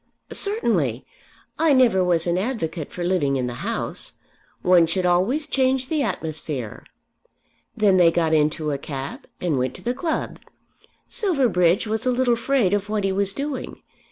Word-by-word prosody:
"Certainly. 195 - 0 0.5
I 320 -2 +4
never 235 -8 +4
was 170 -2 +2
an 170 -1 +1
advocate 180 - -3
for 175 - -5
living 175 -6 +1
in 130 -2 -1
the 120 -1 -5
House. - - -3 0.5
One 180 -2 +5
should 180 +2 -1
always 190 - +2
change 260 -2 +1
the 310 -2 0
atmosphere." 155 - -4 0.9
Then 205 -3 +4
they 175 -2 +6
got 165 -1 +1
into 155 0 +1
a 140 - -2
cab 135 -1 -6
and 160 -7 0
went 130 0 -1
to - - -12
the 245 - 0
club. 315 +5 -3 0.7
Silverbridge 230 - +2
was 220 +3 -2
a - - +4
little 250 -1 +2
afraid 235 -4 +1
of 205 0 -1
what 210 -1 -1
he 195 - +1
was 200 +1 0
doing. 280 -2 -5
190 Hz, 160 wpm, -23 LUFS, 160-255 Hz, 0.9 s, they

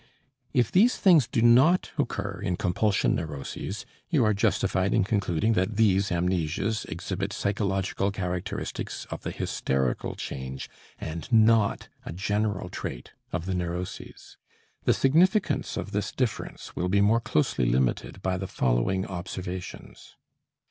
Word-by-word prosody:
If 120 -3 +2
these 225 +7 +4
things 165 - +5
do 120 -2 0
not 130 +10 +5
occur 100 -9 -2
in 90 -4 -1
compulsion 95 +3 +1
neuroses, 80 +6 -5 0.2
you 150 -9 +3
are 105 - +3
justified 100 -2 +1
in - - +4
concluding 100 0 +1
that 95 +1 0
these 100 -2 +3
amnesias 90 +4 0
exhibit 95 +4 -4
psychological 100 -1 -1
characteristics 95 +1 -4
of - - -5
the - - -4
hysterical 65 -2 -1
change, 65 0 -6 0.3
and 80 +8 -6
not 110 -2 +4 0.2
a - - -6
general 100 +2 -1
trait 60 -8 -6 0.2
of 85 0 -3
the 95 - -2
neuroses. 90 0 -5 0.5
The - - +5
significance 180 +9 +2
of 100 - -4
this 105 -1 -2
difference 125 -4 -3
will 90 +1 -1
be 100 +2 +3
more 110 +3 +4
closely 75 - +1
limited 65 +1 0
by 95 -1 0
the 95 +1 -4
following 65 +11 +1
observations. 90 -7 -7
95 Hz, 135 wpm, -27 LUFS, 90-110 Hz, 0.5 s, things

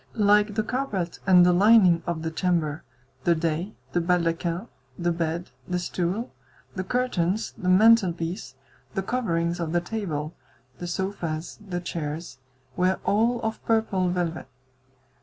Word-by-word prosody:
Like 210 0 +4
the 215 - +1
carpet 210 -8 -2
and 180 -2 +7
the 180 - +5
lining 190 -3 +6
of 165 -2 -2
the 160 - -2
chamber, 160 -3 0 0.4
the 170 - +3
dais, 165 +4 -1 0.2
the 175 - +1
baldaquin, 170 +2 0 0.3
the 175 0 0
bed, 165 +1 -2 0.2
the 180 - -1
stool, 180 - -2 0.4
the 185 - -3
curtains, 215 -3 0
the 185 - -2
mantelpiece, 185 - +3 0.4
the 195 - 0
coverings 175 -7 -1
of 165 -1 -2
the 175 - +3
table, 170 -6 -4 0.5
the 175 - -5
sofas, 175 -3 -3
the 180 -3 -4
chairs, 155 -5 -5 0.4
were 185 +1 +1
all 230 +3 +2
of 220 0 -3
purple 220 -5 +1
velvet. 175 -2 -2
180 Hz, 140 wpm, -25 LUFS, 170-205 Hz, 0.5 s, and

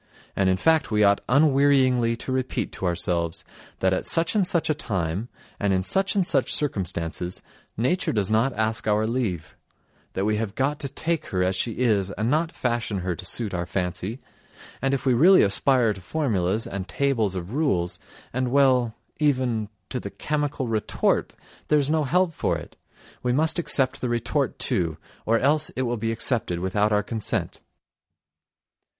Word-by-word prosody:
And, 95 -1 +2
in 95 - +2
fact, 160 +5 +2
we 105 -1 +2
ought 100 0 +4
unwearyingly 135 -4 +4
to 130 - -5
repeat 130 -3 -2
to 95 - -3
ourselves 85 -1 -1 0.4
that 95 0 +3
at 95 - -2
such 165 0 +3
and 200 -4 +2
such 170 -2 0
a 155 - +2
time 95 - -3 0.3
and 100 -2 +1
in 95 0 +1
such 195 - +1
and 195 -3 +2
such 135 -7 +1
circumstances 90 - -2 0.3
nature 150 - +1
does 105 -2 0
not 115 +5 +3
ask 110 0 -1
our 105 +1 +2
leave; 110 -9 -2 0.6
that 95 - -1
we 105 0 +1
have 110 -2 -3
got 145 +3 0
to 140 - -1
take 165 +3 -2
her 90 -1 0
as 95 +1 +1
she 115 +5 -1
is 105 -6 +1
and 110 +4 -2
not 160 +2 +1
fashion 120 -5 -2
her 90 0 -1
to 85 - -8
suit 110 0 -1
our 85 -1 -2
fancy, 95 +6 -3 0.6
and 135 +1 +1
if 135 - -5
we 130 - +4
really 175 +10 +6
aspire 115 +3 +3
to 95 - -11
formulas 105 - -1
and 95 -1 -5
tables 115 - 0
of 90 +4 -5
rules, 95 - 0 0.3
and 130 0 0
well, 130 -4 +3 0.2
even... 125 -7 +1 0.2
to 125 - -3
the - - -6
chemical 145 -3 -2
retort, 110 -2 0 0.3
there's 150 -1 +2
no 155 -2 +2
help 180 +5 +2
for - - -1
it, - - -11 0.5
we 125 - 0
must 155 +6 +1
accept 135 -6 +1
the 125 - -1
retort 120 -1 -1
too, 80 -4 0 0.3
or 115 +1 +4
else 150 +5 +2
it 130 - -1
will 120 -1 -1
be 115 0 -2
accepted 115 -6 0
without 105 +4 +1
our 105 0 +2
consent...." 110 -1 -3
115 Hz, 175 wpm, -24 LUFS, 95-140 Hz, 0.6 s, really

